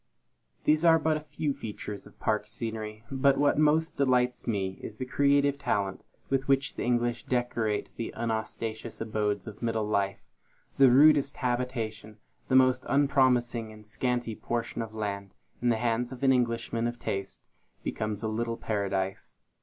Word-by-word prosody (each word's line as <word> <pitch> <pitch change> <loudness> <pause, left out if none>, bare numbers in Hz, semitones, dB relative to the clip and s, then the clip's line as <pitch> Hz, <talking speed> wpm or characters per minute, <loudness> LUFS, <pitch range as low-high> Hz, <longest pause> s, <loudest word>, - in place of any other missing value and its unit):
These 155 +1 +3
are 165 -1 +7
but 160 0 +1
a - - -4
few 150 0 -3
of - - -6
the - - -25
features 105 -2 -6
of - - -19
park - - 0
scenery; 110 -1 -5
but 135 0 +3
what 145 +1 +3
most 155 +2 +2
delights 125 -2 +1
me, 95 -4 -1
is 105 - -8
the 130 - -3
creative 140 +1 +2
talent 100 -8 -1 0.3
with 135 0 0
which 135 0 +2
the - - -6
English 120 -1 0
decorate 120 -4 0
the 115 - -3
unostentatious 110 0 -3
abodes 105 -3 -1
of 105 -1 -9
middle 115 -2 0
life. 100 -2 0 0.6
The 135 -2 +8
rudest 140 +2 +5
habitation, 120 -4 -3 0.3
the 130 - +2
most 130 -1 +5
unpromising 130 -5 +2
and 105 0 -14
scanty 120 +1 -1
portion 120 +1 -3
of 110 -1 -6
land, 100 -2 -4 0.3
in 120 - +2
the 115 - +3
hands 120 +1 0
of 130 0 -8
an 135 -1 +6
Englishman 115 -1 0
of 120 0 -4
taste, 100 -4 -4 0.4
becomes 105 0 -3
a - - 0
little 115 +1 -2
paradise. 95 -2 -2
120 Hz, 165 wpm, -29 LUFS, 110-130 Hz, 0.6 s, The